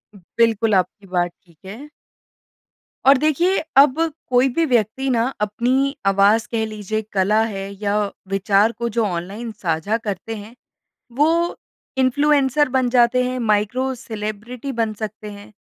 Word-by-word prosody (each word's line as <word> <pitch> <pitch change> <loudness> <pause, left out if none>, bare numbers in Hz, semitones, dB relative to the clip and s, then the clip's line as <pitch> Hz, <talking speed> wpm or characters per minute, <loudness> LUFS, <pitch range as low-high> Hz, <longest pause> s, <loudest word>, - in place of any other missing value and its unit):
बिल्कुल 225 +3 0
आपकी 190 +2 -1
बात 175 -1 0
ठीक 170 -3 -24
है। 230 +10 -9 1.2
और 275 0 +7
देखिए 310 +6 +2 0.2
अब 280 +2 +6 0.3
कोई 255 +1 +3
भी 330 +1 +2
व्यक्ति 250 +1 0
ना 230 -2 +2 0.2
अपनी 255 +7 0
आवाज़ 200 +3 +3
कह 220 -1 0
लीजिए 215 0 -4
कला 205 +3 +2
है 195 0 -5
या 205 0 +1 0.3
विचार 195 +3 +2
को 235 +1 -4
जो 230 0 0
ऑनलाइन 200 +6 -4
साझा 185 +1 -1
करते 220 0 -5
हैं, 215 +3 -10 0.6
वो 325 +7 +1 0.4
इन्फ़्लुएन्सर 280 +1 +2
बन 255 -1 +1
जाते 245 0 +3
हैं, 255 0 -2
माइक्रो 230 +4 0
सेलिब्रिटी 230 +2 -6
बन 225 -3 -1
सकते 215 0 -7
हैं। 205 +1 -12
225 Hz, 140 wpm, -20 LUFS, 205-255 Hz, 1.2 s, और